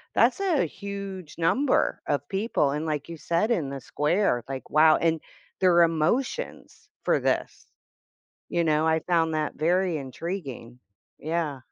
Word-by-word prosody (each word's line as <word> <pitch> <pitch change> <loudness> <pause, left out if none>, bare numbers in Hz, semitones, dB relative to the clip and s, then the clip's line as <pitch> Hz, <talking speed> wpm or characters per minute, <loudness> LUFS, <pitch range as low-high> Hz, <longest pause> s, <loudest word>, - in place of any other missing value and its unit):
that's - - +4
a 350 - +2
huge 195 -2 -7
number 255 - +2
of 145 -1 -1
people. 195 -8 +1
And 150 +2 -2
like 150 -1 -2
you 165 - -7
said 170 +8 0
in 155 -11 0
the 135 -1 -6
square, 150 - +1
like 135 -1 -6
wow, 155 +1 +6
and 165 -1 +1 0.4
their 175 -2 +5
emotions 170 - -1
for - - +2
this. - - -2 0.8
You 170 -1 +1
know, 155 0 +2
I 160 0 +3
found 165 -2 +2
that 155 -1 -1
very 175 +1 +1
intriguing. 135 -4 -6 0.4
Yeah. 155 -3 -2
165 Hz, 145 wpm, -26 LUFS, 150-185 Hz, 0.8 s, wow